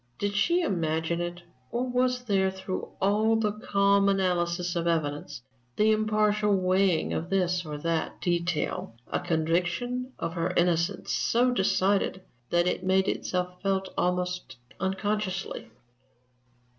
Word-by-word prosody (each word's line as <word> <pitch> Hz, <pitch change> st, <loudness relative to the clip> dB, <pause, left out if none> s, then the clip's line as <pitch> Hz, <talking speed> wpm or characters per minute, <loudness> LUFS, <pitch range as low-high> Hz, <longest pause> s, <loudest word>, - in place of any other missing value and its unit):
Did 205 Hz, 0 st, -1 dB
she 340 Hz, -, +2 dB
imagine 165 Hz, -, 0 dB
it, 175 Hz, 0 st, -5 dB, 0.3 s
or 245 Hz, +2 st, -1 dB
was 250 Hz, 0 st, +1 dB
there, 195 Hz, -4 st, +2 dB
through 190 Hz, 0 st, -5 dB
all 215 Hz, +3 st, +3 dB
the 220 Hz, -2 st, +1 dB
calm 200 Hz, -1 st, +2 dB
analysis 180 Hz, -2 st, 0 dB
of 170 Hz, 0 st, -1 dB
evidence, 145 Hz, -6 st, -2 dB, 0.3 s
the 215 Hz, +1 st, +4 dB
impartial 215 Hz, -1 st, +2 dB
weighing 185 Hz, -2 st, +2 dB
of 170 Hz, +2 st, -3 dB
this 180 Hz, -2 st, +1 dB
or 150 Hz, -1 st, -4 dB
that 165 Hz, +2 st, -2 dB
detail, 170 Hz, -8 st, -1 dB, 0.2 s
a -, -, +1 dB
conviction 175 Hz, +10 st, -1 dB
of 165 Hz, -, -3 dB
her 170 Hz, 0 st, -2 dB
innocence 175 Hz, +2 st, +1 dB
so 245 Hz, +2 st, +2 dB
decided 190 Hz, -3 st, +1 dB, 0.3 s
that 175 Hz, 0 st, +3 dB
it 180 Hz, -, -1 dB
made 190 Hz, +1 st, +2 dB
itself 180 Hz, 0 st, -2 dB
felt 195 Hz, -1 st, -1 dB
almost 180 Hz, -3 st, -1 dB, 0.2 s
unconsciously? 195 Hz, -, -2 dB
190 Hz, 130 wpm, -28 LUFS, 175-205 Hz, 0.3 s, the